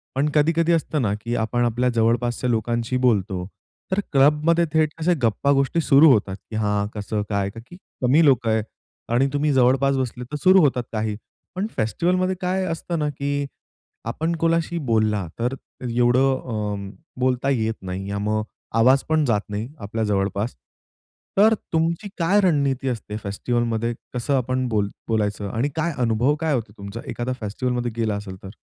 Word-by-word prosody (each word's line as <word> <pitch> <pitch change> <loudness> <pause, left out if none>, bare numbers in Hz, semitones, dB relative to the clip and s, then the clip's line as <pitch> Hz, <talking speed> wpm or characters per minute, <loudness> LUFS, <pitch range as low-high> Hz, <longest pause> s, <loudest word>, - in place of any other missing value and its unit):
पण 145 +3 +1
कधी-कधी 165 +3 +3
असतं 155 -3 0
ना 105 -3 +1
की 120 +1 -2
आपण 120 +2 0
आपल्या 120 +2 +1
जवळपासच्या 120 +2 +1
लोकांशी 120 +2 0
बोलतो, 95 -5 +1 0.5
तर 190 - +1
क्लबमध्ये 150 +4 +4
थेट 155 -1 +3
अशा 170 +3 +2
गप्पा 115 +5 +2
गोष्टी 140 +4 +2
सुरू 145 +1 +6
होतात, 100 -5 +1
की 110 - -6
हां 105 -1 0
कसं, 105 0 -2
काय, 100 -1 0
की 120 +9 -11 0.3
कमी 140 +6 +4
लोक 130 -5 +3
आहेत 110 -1 +2 0.5
आणि 130 +3 +3
तुम्ही 145 +1 +1
जवळपास 135 +2 +3
बसले 125 -1 -3
तर - - -3
सुरू 185 +1 +7
होतात 130 -4 +2
काही 110 -1 -2 0.4
पण 200 +3 -1
फेस्टिव्हलमध्ये 180 +11 +1
काय 185 +1 0
असतं 165 0 -3
ना, 150 -1 0
की 140 0 -2 0.6
आपण 160 +8 -1
कोणाशी 165 +1 0
बोलला 105 -4 +1
तर 125 +3 0 0.3
एवढं 120 +2 +3 0.3
अं, 105 -2 -3 0.3
बोलता 130 +1 +1
येत 110 -4 +1
नाही 95 +1 -5
मग 110 +1 0 0.3
आवाज 130 +4 +5
पण 155 -1 +3
जात 110 -5 +2
नाही 105 +3 -3
आपल्या 110 +2 -3
जवळपास. 100 - -1 0.8
तर 220 +2 +6 0.2
तुमची 165 +4 0
काय 185 +4 +3
रणनीती 140 -7 +1
असते 105 -3 -4
फेस्टिव्हलमध्ये 115 +3 -1 0.2
कसं 125 +3 0
आपण 130 0 -1
बोल 105 -3 0 0.2
बोलायचं 105 -2 -1
आणि 120 +7 -1
काय 160 0 0
अनुभव 120 +5 +2
काय 160 -2 +1
होतो 115 -5 -2
तुमचा, 100 +3 -7
एखादा 125 +1 -3
फेस्टिव्हलमध्ये 120 +3 -2
गेला 110 -3 0
असेल 100 -2 -6
तर? 95 - -7
125 Hz, 160 wpm, -23 LUFS, 110-150 Hz, 0.8 s, सुरू